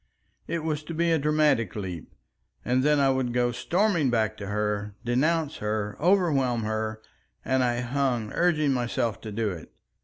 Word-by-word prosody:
It 170 -2 -2
was 155 -2 -1
to 165 - -6
be 170 +1 +2
a 160 - +3
dramatic 150 -8 +2
leap, 95 -6 -6 0.5
and 125 +1 +2
then 150 +1 +3
I 135 -1 +4
would 130 -2 -1
go 120 0 +2
storming 170 - +1
back 110 -2 +1
to 100 - -6
her, 105 0 -2
denounce 150 +5 +1
her, 105 -1 -2
overwhelm 145 - +2
her; 110 0 -3 0.4
and 130 -1 +2
I 120 -1 0
hung, 120 -3 -1
urging 155 -5 +2
myself 120 -3 -1
to 110 - -7
do 105 0 -1
it. 85 -3 -9
125 Hz, 165 wpm, -26 LUFS, 110-150 Hz, 0.5 s, I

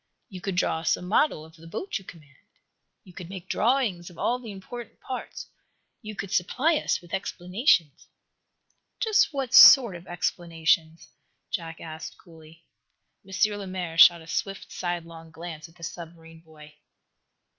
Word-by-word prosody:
"You 185 -2 -9
could 195 -1 -3
draw 170 -2 +1
us 165 - +1
a - - -10
model 180 - +1
of 160 0 -17
the 165 0 -15
boat 290 - -4
you - - -16
command. 150 -7 -15 0.7
You 180 - -16
could 175 -1 -9
make 185 -1 -9
drawings 220 -9 0
of 175 - -16
all 245 +1 0
the 240 -3 -10
important 220 +4 -9
parts. 255 - -7 0.6
You 215 -2 -8
could 195 -1 -6
supply 275 - +1
us - - -1
with 175 -1 -16
explanations." 180 - 0 0.9
"Just 440 -5 +3
what 270 -4 -4
sort 240 -9 +9
of 175 +2 -11
explanations?" 165 -2 -1 0.4
Jack 165 -1 -5
asked, 155 -1 -8
coolly. 160 -1 -17 0.6
M. 190 - -16 0.3
Lemaire 185 -4 -5
shot 170 -1 +8
a - - -15
swift, 195 +4 -4
sidelong 165 -2 -5
glance 160 0 -9
at 165 - -23
the 170 - -16
submarine 165 -1 -9
boy. 155 -2 -16
175 Hz, 155 wpm, -26 LUFS, 165-195 Hz, 0.9 s, sort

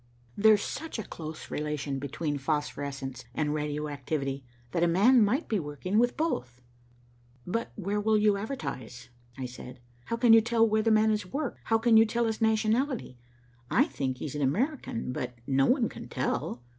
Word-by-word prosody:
There's 215 0 +5
such 320 -1 -5
a 220 - -3
close 155 -3 -8
relation 150 -2 -2
between 145 +1 -3
phosphorescence 140 -3 -3
and 150 -1 0
radioactivity, 145 -2 -3 0.3
that 170 - 0
a 175 - +4
man 215 +8 +5
might 250 +10 +1
be 215 - 0
working 160 +7 -1
with 240 +1 +2
both." 125 - -2 0.9
"But 230 +6 -2
where 205 0 -2
will 215 +1 +3
you 210 -1 +4
advertise?" 130 - -6 0.3
I 130 - -4
said. 125 0 -9 0.3
"How 230 - -2
can 235 -1 +6
you 225 - +8
tell 230 0 +3
where 215 0 +2
the 225 - +1
man 220 0 +4
has 210 -3 -1
worked? 275 +6 -3
How 225 - +3
can 225 0 +4
you 225 - +7
tell 235 +2 0
his 225 0 -2
nationality? 220 - +1 0.5
I - - +4
think 130 -2 -3
he - - -5
is 145 - -5
an 150 - -3
American, 235 - -1
but 125 -1 -4
no 135 0 +3
one 250 -3 +3
can - - -9
tell." 120 - -2
195 Hz, 180 wpm, -29 LUFS, 140-225 Hz, 0.9 s, you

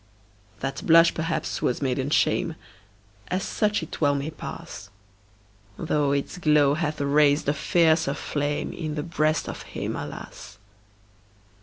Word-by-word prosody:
That 135 -1 -3
blush, 165 0 +6
perhaps, 160 -1 -2
was 125 - 0
maiden 135 0 -1
shame 160 +2 +1 0.7
As 185 +1 -1
such 210 -4 0
it 160 - -8
well 145 -1 +3
may 140 +3 -3
pass 100 - -8 0.9
Though 150 -3 0
its 140 +5 -2
glow 150 -4 +4
hath 155 -1 -2
raised 145 +1 +3
a 145 - +3
fiercer 160 -1 +2
flame 145 0 -2
In 155 -3 -4
the 150 - -2
breast 155 -2 0
of - - -6
him, - - -5
alas! - - -8
150 Hz, 135 wpm, -25 LUFS, 140-160 Hz, 0.9 s, blush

